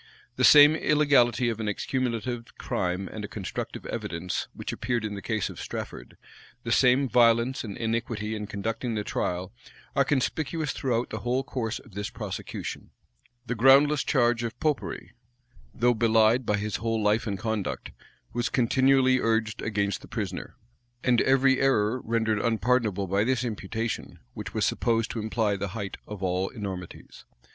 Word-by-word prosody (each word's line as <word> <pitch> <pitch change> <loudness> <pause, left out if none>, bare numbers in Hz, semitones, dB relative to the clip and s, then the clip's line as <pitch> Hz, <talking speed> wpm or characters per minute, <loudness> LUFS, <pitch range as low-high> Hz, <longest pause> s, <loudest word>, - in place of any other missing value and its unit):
The - - -1
same 150 +1 +9
illegality 140 -6 +3
of 115 -1 -3
an 110 - -3
accumulative 120 +1 -3
crime 90 +1 -2
and 110 - -7
a - - -4
constructive 100 -2 -6
evidence 85 +2 -3
which - - -6
appeared 120 -3 -2
in 105 - -3
the 100 - -6
case 110 0 -1
of - - -8
Strafford, - - -7 0.5
the - - -3
same 130 +2 +4
violence 120 +1 +3
and 100 -4 -6
iniquity 115 -2 -2
in 105 -1 -4
conducting 110 +3 -3
the 105 - -1
trial, 90 0 -3 0.4
are 140 - +4
conspicuous 150 +2 -1
throughout 125 -3 -1
the - - -3
whole 125 +2 0
course 120 -3 -3
of 115 - -15
this 105 +3 -4
prosecution. 105 -5 -6 0.6
The 125 - -2
groundless 135 +4 +5
charge 120 -3 +2
of 115 - -5
Popery, 150 -3 -2 0.6
though 120 +1 +2
belied 115 +1 +3
by 105 - +2
his 105 0 -2
whole 115 +1 -1
life 105 +3 +2
and 100 -2 -2
conduct, 110 0 -3 0.4
was 120 -2 -1
continually 130 +1 +3
urged 110 -2 0
against 100 -3 -1
the - - -12
prisoner; - - -5 0.5
and 125 -2 +3
every 135 0 +4
error 125 -2 +2
rendered 110 -2 0
unpardonable 115 -3 +1
by 100 +2 +1
this 130 +1 +1
imputation, 110 0 -4 0.2
which - - -7
was - - +2
supposed 115 -1 0
to 115 - -4
imply 110 -1 0
the 100 0 -3
height 100 -2 -5
of 105 -2 -7
all 95 +1 0
enormities. 95 -7 -8
115 Hz, 160 wpm, -27 LUFS, 105-125 Hz, 0.6 s, same